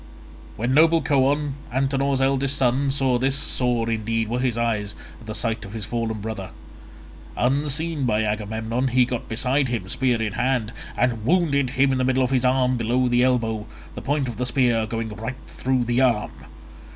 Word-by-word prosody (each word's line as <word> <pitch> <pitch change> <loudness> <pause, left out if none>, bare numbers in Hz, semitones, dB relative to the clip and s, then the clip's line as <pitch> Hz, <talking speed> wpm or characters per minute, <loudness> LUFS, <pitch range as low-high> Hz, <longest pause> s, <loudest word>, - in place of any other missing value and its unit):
When 120 +4 -1
noble 165 +3 +5
Coon, 145 0 +2 0.2
Antenor's 135 +1 0
eldest 135 +1 +1
son, 135 +2 +2
saw 135 -2 +1
this, 135 +2 +1
sore 125 -5 0
indeed 115 0 -1
were 120 +2 -1
his 125 -2 0
eyes 105 -3 -1 0.2
at 115 - -15
the 110 - -4
sight 115 -1 -1
of 100 - -9
his 110 -3 -5
fallen 115 -2 -3
brother. 105 -3 -5 0.9
Unseen 145 +3 0
by 110 -2 +1
Agamemnon 110 +4 -2
he 125 0 +3
got 125 -1 -5
beside 130 +4 +1
him, 115 -6 -3
spear 125 -1 +1
in 110 -3 -2
hand, 125 -2 0 0.2
and 115 -3 0
wounded 140 -3 +2
him 135 0 +4
in 130 - 0
the - - +1
middle 130 0 +2
of 125 - -1
his 130 -2 +2
arm 130 0 +2
below 120 +2 +1
the 120 0 +2
elbow, 115 -4 +1 0.3
the - - -7
point 140 -1 0
of 120 -3 -5
the 125 - -1
spear 120 -3 +2
going 115 0 -3
right 115 +5 -6
through 130 -1 -1
the 120 +2 +1
arm. 120 -5 +2
125 Hz, 185 wpm, -23 LUFS, 115-135 Hz, 0.9 s, noble